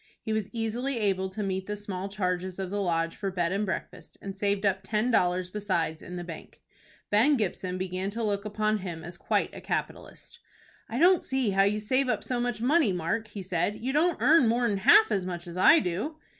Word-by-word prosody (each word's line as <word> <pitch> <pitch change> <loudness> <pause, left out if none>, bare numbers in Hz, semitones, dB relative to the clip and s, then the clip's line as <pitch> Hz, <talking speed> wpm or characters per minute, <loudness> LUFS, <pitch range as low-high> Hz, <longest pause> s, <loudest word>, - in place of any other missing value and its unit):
He 220 - -3
was 215 -2 -2
easily 235 +4 -2
able 190 -3 0
to 205 +3 -4
meet 190 -1 -3
the 210 - -2
small 195 -2 -5
charges 185 -2 -2
of 190 -1 -4
the 205 0 -1
Lodge 165 -2 0
for 195 - -3
bed 175 -2 -1
and 200 +2 -1
breakfast, 190 - -6
and 195 -1 -7
saved 200 0 0
up 190 -1 +2
ten 215 +5 0
dollars 180 -3 +1
besides 185 -6 -2
in 180 - -8
the 175 - -5
bank. 165 -2 -10 0.5
Ben 250 +8 +4
Gibson 185 -3 -2
began 185 +1 -3
to 225 +3 -4
look 200 -2 -1
upon 215 0 0
him 170 -4 -6
as 170 +1 -8
quite - - -1
a - - -9
capitalist. - - -5 0.5
"I - - -3
don't 355 +2 +5
see 260 -5 -1
how 195 0 +4
you 210 +1 +1
save 255 +5 +1
up - - 0
so 250 -1 -2
much 240 -2 -2
money, 295 - +3
Mark," 185 +6 -2
he 205 -2 -7
said. 185 +3 -1
"You 260 +4 -3
don't 325 +3 +2
earn 275 +1 +5
more'n 230 -2 +1
half 425 - +6
as 195 - +1
much 175 -1 -5
as 170 -1 -8
I 310 - +7
do." 210 - -2
200 Hz, 215 wpm, -28 LUFS, 185-225 Hz, 0.5 s, I